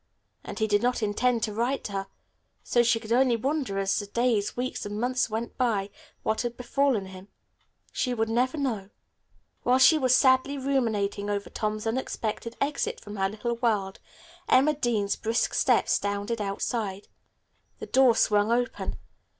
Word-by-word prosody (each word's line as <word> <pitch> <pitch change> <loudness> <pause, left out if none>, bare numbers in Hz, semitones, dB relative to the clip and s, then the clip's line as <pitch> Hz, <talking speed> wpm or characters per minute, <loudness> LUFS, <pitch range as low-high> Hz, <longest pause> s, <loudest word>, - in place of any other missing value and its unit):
And - - -8
he 220 - +1
did 205 -1 +2
not 245 -1 0
intend 230 +3 +1
to 215 - -1
write 240 +5 -1
to - - -5
her, 195 0 -3 0.6
so 240 - +3
she 235 -1 +2
could 220 0 -10
only 250 0 +4
wonder 260 -3 -2
as 195 +2 +1
the 205 - -6
days, 230 -1 0
weeks 255 +1 -3
and 205 +1 -5
months 250 0 0
went 225 +2 -4
by 210 -5 0 0.3
what 220 - 0
had 240 -1 -4
befallen 250 -4 +1
him. 190 0 -11 0.6
She 250 - -1
would 225 -2 0
never 250 +6 0
know. 225 -9 -2 0.7
While 250 +1 +3
she 290 +4 +6
was 255 -2 +4
sadly 260 +1 +3
ruminating 220 -7 -1
over 200 -1 -3
Tom's 215 0 -3
unexpected 230 -1 -3
exit 280 0 -1
from 210 -1 -9
her 195 0 +1
little 235 +3 -3
world, 210 -5 0 0.5
Emma 285 +4 +5
Dean's 230 -8 0
brisk 225 0 -1
step 250 -3 +3
sounded 205 +3 -1
outside. 200 0 -3 0.7
The - - -7
door 260 -3 +4
swung 210 0 +2
open. 245 +1 -1
230 Hz, 165 wpm, -27 LUFS, 205-250 Hz, 0.7 s, she